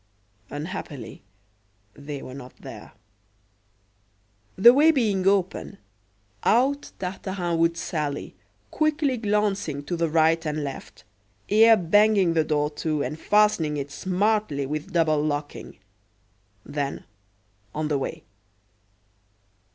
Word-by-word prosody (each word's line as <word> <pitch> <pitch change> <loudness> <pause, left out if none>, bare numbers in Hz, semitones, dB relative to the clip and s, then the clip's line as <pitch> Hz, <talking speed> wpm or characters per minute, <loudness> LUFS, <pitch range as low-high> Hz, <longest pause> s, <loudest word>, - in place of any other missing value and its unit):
Unhappily, 145 - -7 0.7
they 145 -1 -8
were 130 - -9
not 130 -2 -10
there. - - -11 1.6
The 235 +6 +8
way 295 +4 +5
being 210 -11 +1
open, 195 0 0 0.7
out 270 +5 +2
Tartarin 180 -2 -3
would 165 0 +2
sally, 150 -4 -3 0.4
quickly 305 -3 +1
glancing 205 -9 -1
to 160 +5 -3
the 165 -1 0
right 160 +1 +3
and 150 -1 -2
left, 140 -2 -8 0.5
ere 225 +2 +6
banging 200 0 +3
the 160 -1 +2
door 150 -1 0
to 155 -3 -1
and 150 +5 -5
fastening 205 -9 +2
it 140 0 -5
smartly 185 -4 0
with 150 +2 -5
double 155 -3 +2
locking. 145 -1 -4 0.9
Then, 145 -1 -4 0.7
on 155 0 -1
the 145 -2 0
way. 160 +4 -5
165 Hz, 110 wpm, -25 LUFS, 150-205 Hz, 1.6 s, The